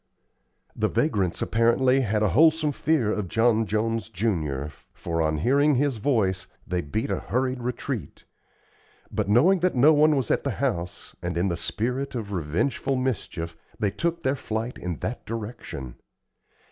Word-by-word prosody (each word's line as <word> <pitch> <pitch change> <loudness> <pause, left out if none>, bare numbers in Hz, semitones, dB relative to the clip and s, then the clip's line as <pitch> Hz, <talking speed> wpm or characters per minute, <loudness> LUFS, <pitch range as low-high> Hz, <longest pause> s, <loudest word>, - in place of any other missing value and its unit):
The - - +1
vagrants, 100 - 0
apparently, 125 +4 +3
had 110 -3 0
a 105 - +3
wholesome 155 - +4
fear 140 -8 +1
of 105 -3 -2
John 115 +2 +2
Jones, 110 -1 -1
junior, 80 -10 -1 0.3
for, 85 -1 -2
on 80 -1 +1
hearing 140 - +3
his 135 -1 +1
voice, 100 -6 0 0.2
they 90 -1 -1
beat 85 +9 -3
a - - 0
hurried 130 0 -1
retreat; 125 0 -4 0.9
but 105 -2 -1
knowing 170 - +5
that 180 -2 +1
no 145 +6 +6
one 150 0 +5
was 130 -5 0
at - - +1
the - - -1
house, 85 +1 -3
and - - -3
in 90 +3 +1
the 85 - -1
spirit 125 +11 -2
of 110 -4 -4
revengeful 95 - -1
mischief, 105 -10 -3 0.2
they 100 -2 0
took 170 +10 -2
their 130 +1 +1
flight 115 -1 -4
in 90 -1 -3
that 120 - -4
direction. 110 - -6
115 Hz, 160 wpm, -25 LUFS, 95-130 Hz, 0.9 s, no